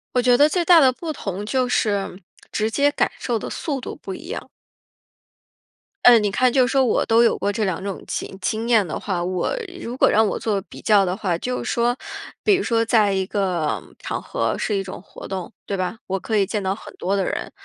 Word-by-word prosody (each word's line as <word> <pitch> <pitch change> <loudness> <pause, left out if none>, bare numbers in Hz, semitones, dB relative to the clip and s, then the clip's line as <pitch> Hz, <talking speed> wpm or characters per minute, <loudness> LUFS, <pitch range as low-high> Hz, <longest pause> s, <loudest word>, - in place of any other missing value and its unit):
我 250 - +4
觉 245 0 +4
得 290 - +6
最 345 +3 0
大 340 0 +7
的 265 -4 +5
不 315 +5 -5
同 200 - -5
就 255 +3 0
是 200 -5 -1 0.3
直 215 +1 -1
接 285 +5 +3
感 290 - 0
受 235 -3 -1
的 - - -5
速 280 -5 -3
度 - - -7
不 195 - -6
一 325 - -9
样。 480 - -5 1.6
嗯， 240 -2 +8
你 205 - +1
看 250 +4 +2
就 255 -2 +4
是 - - -3
说 270 -1 +3
我 240 - +2
都 230 +1 +4
有 235 - +3
过 205 - -1
这 210 0 -1
2 185 -1 -2
种 200 -1 -5
经 190 - -5
经 220 +5 -2
验 215 -6 +4
的 - - -4
话， 180 -4 -2
我 185 - -1 0.3
如 240 +2 -5
果 - - +5
让 220 0 +4
我 - - -2
做 205 -3 -1
比 180 - -13
较 205 -2 +4
的 185 0 -1
话， 190 -5 -1
就 250 +9 -3
是 - - -2
说， 240 +1 +1 0.5
比 420 - +4
如 380 - +2
说 230 -6 +1
在 220 -3 +3
一 190 -1 0
个 185 -6 -1 0.2
场 - - -4
合 - - -1
是 210 - -1
一 195 - -1
种 190 -2 -8
活 - - -11
动， 190 -1 -5
对 200 - -2
吧？ 185 +3 -2
我 195 0 -2
可 220 +2 -1
以 195 - +3
见 210 +2 -2
到 190 0 -1
很 220 - -12
多 195 +2 -1
的 195 - 0
人， - - -3
215 Hz, 250 characters per minute, -22 LUFS, 195-250 Hz, 1.6 s, 嗯